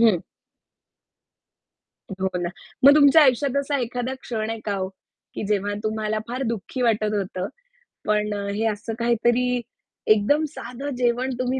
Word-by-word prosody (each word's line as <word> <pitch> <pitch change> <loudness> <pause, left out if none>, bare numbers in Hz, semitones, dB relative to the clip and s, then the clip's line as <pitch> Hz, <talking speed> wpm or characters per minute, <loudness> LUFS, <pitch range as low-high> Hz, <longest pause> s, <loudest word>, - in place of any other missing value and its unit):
हं. 220 -7 +5 2.0
हो 190 - +2
ना. 175 - -1 0.4
मग 280 - +10
तुमच्या 290 +2 +7
आयुष्यात 275 0 +3
असा 280 0 -1
एखादा 245 +2 -2
क्षण 220 -2 -3
आहे 225 -1 -4
का 205 - -1
हो? 190 -1 -2 0.5
की - - -4
जेव्हा 205 0 0
तुम्हाला 215 0 -1
फार 255 +2 -3
दुःखी 230 +3 -3
वाटत 215 -2 +2
होतं. 190 -1 -2 0.6
पण 210 0 +1
अ, 200 0 -4
हे 215 +3 -1
असं 220 +2 -3
काहीतरी 240 +1 +2 0.5
एकदम 285 +9 +2
साधं 255 0 -7
जेवण 250 +1 +1
तुम्ही 255 +1 0
230 Hz, 145 wpm, -24 LUFS, 210-255 Hz, 2.0 s, मग